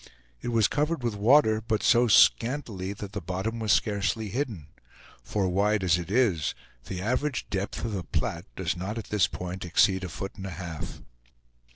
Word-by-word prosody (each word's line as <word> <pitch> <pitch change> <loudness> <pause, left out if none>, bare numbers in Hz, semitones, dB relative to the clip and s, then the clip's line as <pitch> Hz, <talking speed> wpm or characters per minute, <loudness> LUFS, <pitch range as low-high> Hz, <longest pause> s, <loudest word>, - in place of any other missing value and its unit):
It - - -6
was 115 -4 +3
covered 150 -1 -1
with 120 -2 0
water, 110 +1 +4
but 110 -1 -1
so 120 0 +5
scantily 105 - +3
that 100 -1 -8
the 100 - -5
bottom 95 +7 -3
was 110 -2 0
scarcely 105 +1 +1
hidden; 115 - -3 0.6
for, 100 -3 -1
wide 100 +2 +1
as 90 -1 +3
it 85 0 -6
is, 100 - +2 0.3
the 90 - -5
average 130 +5 -1
depth 100 +3 -3
of 115 - -3
the 95 -3 -3
Platte 85 +3 -3
does 95 -1 -1
not 95 +5 -4
at 115 - -6
this 100 -5 +3
point 90 +1 -6
exceed 95 +2 +3
a 90 - -4
foot 95 +4 -5
and 95 - -6
a 90 -4 -7
half. 85 -4 -6
100 Hz, 185 wpm, -27 LUFS, 90-115 Hz, 0.6 s, so